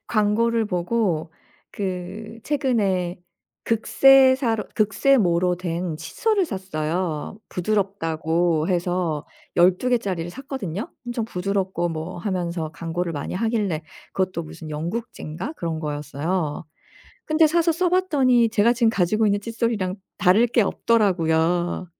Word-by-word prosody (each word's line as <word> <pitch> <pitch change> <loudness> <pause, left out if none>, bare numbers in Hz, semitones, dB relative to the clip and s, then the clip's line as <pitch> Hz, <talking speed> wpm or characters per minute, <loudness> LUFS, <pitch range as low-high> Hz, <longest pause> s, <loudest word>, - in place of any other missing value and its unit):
광고를 225 +1 +2
보고 180 -3 -1 0.4
그 195 +3 -5
최근에 205 -11 0 0.5
극세사로 260 0 +4
극세모로 195 -6 +3
된 170 -2 -3
칫솔을 380 - 0
샀어요. 175 - -3
부드럽다고 170 -4 0
해서 175 -3 -1 0.3
12 180 +8 +4
개짜리를 185 -8 -1
샀거든요. 245 - -5 0.2
엄청 240 -2 -2
부드럽고 190 -3 -1
뭐 160 +3 -5
하면서 175 -4 -3
광고를 170 +1 -3
많이 145 +3 -4
하길래 210 -6 0 0.3
그것도 185 -2 -1
무슨 155 0 -9
영국제인가 170 - -5
그런 165 - -3
거였어요. 150 +2 -3 0.6
근데 310 +1 +4
사서 335 +1 +2
써 360 +3 +1
봤더니 275 -11 +3
제가 225 +1 +4
지금 230 -2 +3
가지고 215 +2 +2
있는 205 0 +2
칫솔이랑 230 -4 -1 0.2
다를 205 +7 +5
게 235 - +2
없더라고요. 175 -5 +1
190 Hz, 280 characters per minute, -23 LUFS, 170-230 Hz, 0.6 s, 다를